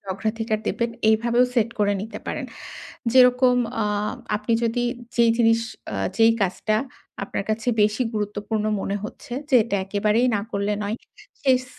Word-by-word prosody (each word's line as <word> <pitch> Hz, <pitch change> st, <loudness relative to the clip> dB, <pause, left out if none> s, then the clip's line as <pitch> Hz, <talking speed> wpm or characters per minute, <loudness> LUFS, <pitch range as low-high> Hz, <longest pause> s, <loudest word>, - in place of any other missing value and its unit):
অগ্রাধিকার 220 Hz, +2 st, -2 dB
দেবেন 235 Hz, 0 st, 0 dB, 0.2 s
এইভাবেও 235 Hz, +3 st, +3 dB
সেট 230 Hz, -1 st, +3 dB
করে 205 Hz, -1 st, +3 dB
নিতে 215 Hz, 0 st, -7 dB
পারেন। -, -, -3 dB, 0.7 s
যেরকম 250 Hz, 0 st, +6 dB, 0.3 s
অ -, -, +1 dB, 0.5 s
আপনি 210 Hz, +3 st, -2 dB
যদি 235 Hz, +1 st, 0 dB, 0.3 s
যেই 235 Hz, -1 st, +5 dB
জিনিস 225 Hz, -1 st, +4 dB, 0.3 s
অ্যা -, -, -3 dB, 0.2 s
যেই 225 Hz, 0 st, +6 dB
কাজটা 195 Hz, +3 st, 0 dB, 0.5 s
আপনার 195 Hz, -, -4 dB
কাছে 220 Hz, +3 st, -1 dB
বেশি 210 Hz, +4 st, +2 dB
গুরুত্বপূর্ণ 210 Hz, +1 st, -2 dB, 0.2 s
মনে 200 Hz, +1 st, -2 dB
হচ্ছে 240 Hz, -, -9 dB, 0.2 s
যে -, -, +3 dB
এটা 205 Hz, -, -1 dB
একেবারেই 210 Hz, +4 st, +1 dB
না -, -, -1 dB
করলে 200 Hz, +1 st, 0 dB
নয়। 210 Hz, +3 st, -2 dB, 0.5 s
সেই 260 Hz, -1 st, +5 dB
এস 255 Hz, -, -9 dB
220 Hz, 155 wpm, -23 LUFS, 210-235 Hz, 0.7 s, যেরকম